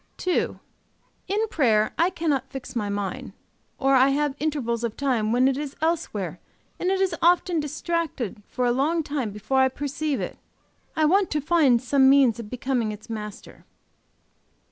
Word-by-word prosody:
"II. 365 - +1 0.7
In 420 +4 0
prayer 220 - +2
I 340 +2 +3
cannot 300 -7 -1
fix 270 -2 -8
my 210 -3 -1
mind, 200 -2 -4 0.4
or 270 0 +2
I 265 +1 +6
have 290 0 +1
intervals 260 -7 -1
of 230 -2 -3
time 245 -6 0
when 250 +2 +4
it 270 -1 +1
is 290 -2 -5
elsewhere 260 - -2 0.4
and 360 - 0
it 385 0 +1
is 380 -3 +1
often 350 0 +3
distracted 300 - -3
for 250 - -2
a 240 - +3
long 305 +6 +1
time 285 -6 -2
before 210 +6 -1
I 265 0 +5
perceive 285 +2 -3
it. - - -5 0.6
I 315 - +3
want 380 +4 +3
to 305 - 0
find 295 -5 +3
some 265 +2 +4
means 265 -5 +4
of 220 -3 -7
becoming 250 -2 -1
its 215 +2 -10
master. 210 -2 -8
270 Hz, 165 wpm, -25 LUFS, 235-315 Hz, 0.7 s, I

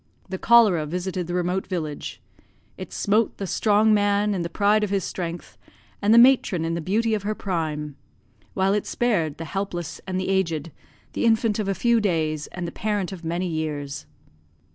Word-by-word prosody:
The 190 0 -4
cholera 210 -10 +5
visited 180 +1 -3
the 175 - -3
remote 180 +1 -1
village. 160 -6 -5 0.5
It - - -8
smote 215 +2 +1
the 200 - -4
strong 215 +3 +3
man 205 0 +2
in 185 - -2
the 170 - -3
pride 210 +4 +2
of 210 - -1
his 195 -2 0
strength, 170 -1 -6 0.4
and 205 +1 +2
the 230 - +7
matron 235 -9 +5
in 165 - -1
the 170 - -2
beauty 220 +7 0
of 210 - 0
her 210 +2 -2
prime; 155 -7 -3 0.6
while 190 +1 +2
it 210 - -1
spared 175 -11 0
the 165 - -6
helpless 175 -3 -4
and 185 0 -2
the 185 - -2
aged, 170 -5 0 0.4
the - - -1
infant 225 -1 +2
of 210 - -1
a 195 - 0
few 235 +4 +2
days, 155 -6 -1
and 180 -1 -5
the - - -5
parent 205 -2 -2
of 185 -3 -8
many 170 +3 -2
years. 150 -4 -4
190 Hz, 185 wpm, -24 LUFS, 165-210 Hz, 0.6 s, the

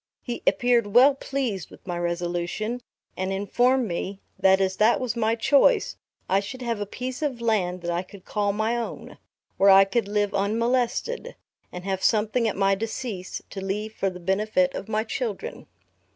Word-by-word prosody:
He 240 -2 -5
appeared 240 -3 +3
well 265 +4 +8
pleased 260 -9 -3
with - - -16
my 175 -2 -3
resolution, 175 +7 -2 0.3
and 190 +1 -2
informed 245 +6 +2
me, 190 +2 -4 0.2
that 190 0 +5
as 190 -1 0
that 220 +3 +4
was 245 -3 -2
my 225 -1 +1
choice, 285 - +3 0.3
I 195 - +3
should 205 +6 -7
have 230 -3 -2
a 205 - -3
piece 255 +5 -5
of 280 -6 -1
land 190 -6 0
that 175 0 -2
I 170 +1 0
could 185 0 -14
call 205 -1 0
my 220 +3 0
own, 235 -1 -6 0.4
where 195 - +5
I 195 0 +8
could 200 +2 -1
live 205 0 0
unmolested, 235 - 0 0.4
and 180 - -7
have 190 -1 -2
something 220 +2 +2
at 210 - -2
my 195 0 +3
decease 220 -2 -4
to 195 - -6
leave 210 +3 -3
for 195 - -1
the 180 -1 -9
benefit 215 +9 +1
of 200 - -6
my 215 0 0
children. 225 -2 -4
210 Hz, 180 wpm, -25 LUFS, 195-240 Hz, 0.4 s, well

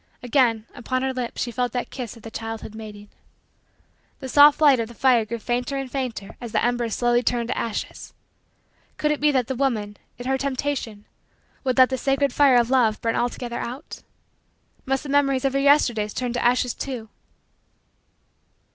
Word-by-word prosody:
Again, 240 -4 +2
upon 255 +2 -3
her 265 0 -1
lips 250 -2 -3
she 240 - -4
felt 245 +1 -2
that 245 - -3
kiss 245 -3 -6
of 225 - -17
the 225 - -9
childhood 225 -1 -6
mating. 210 -2 -10 1.1
The 265 - -6
soft 290 +2 +7
light 285 -5 +5
of 230 - -1
the 235 - -13
fire 250 -4 +3
grew 235 +2 -4
fainter 245 +4 -2
and 270 -2 -5
fainter 250 -7 -4
as 240 -2 -6
the - - +1
embers 240 -2 0
slowly 240 0 +2
turned 240 -1 -1
to - - -1
ashes. 230 -2 -4 0.9
Could 300 - +1
it 300 - -1
be 300 - +3
that 260 -4 +1
the 265 - -3
woman, 225 -6 -1 0.2
in 245 - -8
her 265 +1 0
temptation, 260 -6 -3 0.6
would 255 -1 0
let 260 0 +6
the 260 - -1
sacred 275 0 +1
fire 280 -3 +5
of 240 +1 +2
love 230 -5 +3
burn 230 0 -1
altogether 240 0 -2
out? 255 +5 -7 0.9
Must 270 +1 0
the 290 - -8
memories 275 -2 +2
of 270 - +1
her 275 - +1
Yesterdays 245 -7 +3
turn 250 -2 -2
to 245 - -2
ashes 245 0 +2
too? 250 -5 -6
245 Hz, 185 wpm, -23 LUFS, 230-270 Hz, 1.1 s, soft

